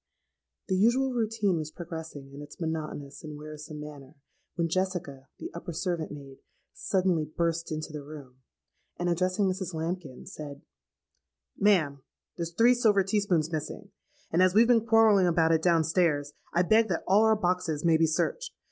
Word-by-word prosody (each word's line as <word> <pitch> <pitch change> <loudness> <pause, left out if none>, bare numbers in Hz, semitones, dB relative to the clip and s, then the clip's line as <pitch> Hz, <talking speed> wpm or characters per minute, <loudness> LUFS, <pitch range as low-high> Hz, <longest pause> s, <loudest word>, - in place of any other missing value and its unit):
"The 190 - 0
usual 245 +7 +3
routine 220 -5 0
was 155 -1 -4
progressing 160 -5 -8
in 140 - -9
its 145 0 -12
monotonous 155 -4 -5
and 150 -1 -7
wearisome 150 0 -9
manner, 150 -1 -10 0.4
when 170 -1 0
Jessica, 165 -7 -3
the - - -7
upper 170 0 -6
servant 170 -1 -2
maid, 140 -2 -10 0.4
suddenly 185 -4 0
burst 165 +2 -2
into 155 0 -4
the 150 - -5
room, 140 -3 -11 0.6
and, 175 0 -1
addressing 185 +3 +1
Mrs. 185 -2 -2
Lambkin, 160 -4 -5
said, 145 0 -9 0.9
'Ma'am, 165 -9 +2 0.3
there's 170 -1 -4
three 230 +8 +5
silver 215 -5 +3
tea 200 +3 +1
spoons 170 -6 0
missing; 155 -2 -5 0.4
and 170 - +3
as 185 0 +4
we've 225 +2 +7
been 230 -2 +3
quarrelling 220 -4 +5
about 165 -1 +3
it 160 -1 +3
down 170 -1 +3
stairs, 155 -4 +1 0.2
I 175 - +2
beg 220 +5 +4
that 170 - -1
all 200 +3 +5
our 220 0 +5
boxes 180 -5 -1
may 165 -1 +5
be 165 0 +3
searched. 475 - -2
170 Hz, 165 wpm, -28 LUFS, 155-190 Hz, 0.9 s, we've